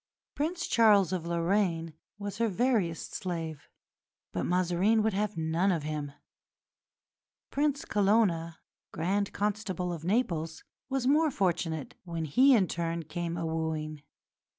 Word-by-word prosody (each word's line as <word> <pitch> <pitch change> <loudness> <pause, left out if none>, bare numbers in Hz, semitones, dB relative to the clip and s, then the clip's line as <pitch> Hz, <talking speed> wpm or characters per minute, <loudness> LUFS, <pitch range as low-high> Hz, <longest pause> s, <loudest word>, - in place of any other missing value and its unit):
Prince 340 +4 -2
Charles 205 -6 +4
of 170 -2 -2
Lorraine 170 -1 0 0.2
was 205 0 -6
her 230 - +3
veriest 210 -5 0
slave, 165 -5 -4 0.6
but - - -2
Mazarin 185 +5 +2
would 220 -1 +1
have 205 -1 -1
none 165 +4 +1
of 165 -4 -1
him. 150 -1 -3 1.4
Prince 285 0 0
Colonna, 195 -6 +2 0.3
Grand 195 +5 0
Constable 200 -4 -2
of 165 -2 -7
Naples, 170 -6 -1 0.3
was 265 -2 -1
more 305 +4 +4
fortunate 170 - -1
when 170 -3 -4
he 260 - +5
in 195 -5 +3
turn 165 0 -2
came 170 +2 -4
a 165 - -2
wooing. 160 -2 -3
180 Hz, 130 wpm, -30 LUFS, 165-210 Hz, 1.4 s, he